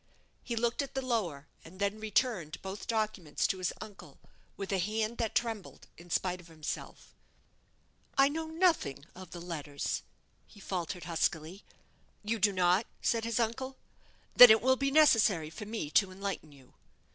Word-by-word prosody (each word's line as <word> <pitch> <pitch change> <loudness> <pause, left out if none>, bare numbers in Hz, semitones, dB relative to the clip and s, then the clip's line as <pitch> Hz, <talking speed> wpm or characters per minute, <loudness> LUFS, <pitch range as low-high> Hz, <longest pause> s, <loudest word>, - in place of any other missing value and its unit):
He 235 - -3
looked 235 +3 0
at 275 -2 -7
the 265 -1 -2
lower, 180 - -1 0.2
and 180 +4 -14
then 200 +1 -1
returned 215 - -1
both 190 +1 -6
documents 215 -8 -1
to 195 -4 0
his 185 - 0
uncle, 210 -3 -11 0.4
with 195 0 -5
a 195 - +1
hand 215 +4 -1
that 225 -1 -1
trembled 230 -5 -3
in 175 +1 -15
spite 180 +1 -1
of 175 - -17
himself. 160 -2 -7 1.0
"I 275 0 +7
know 320 +3 -3
nothing 320 - +1
of 185 -1 -11
the 175 - -8
letters," 155 -5 -4 0.5
he 210 - -17
faltered, 180 -2 -4
huskily. 165 +2 -2 0.6
"You 220 +2 -1
do 205 +1 +4
not!" 185 +3 +2 0.2
said 230 -1 +1
his 230 0 -1
uncle; 260 +4 -2 0.6
"then 245 - +12
it 220 0 +6
will 260 +1 +5
be 275 +1 0
necessary 225 - +4
for 160 +6 -8
me 215 -9 -4
to 195 +2 +4
enlighten 195 -5 -5
you." 135 -3 -19
205 Hz, 165 wpm, -31 LUFS, 175-230 Hz, 1.0 s, then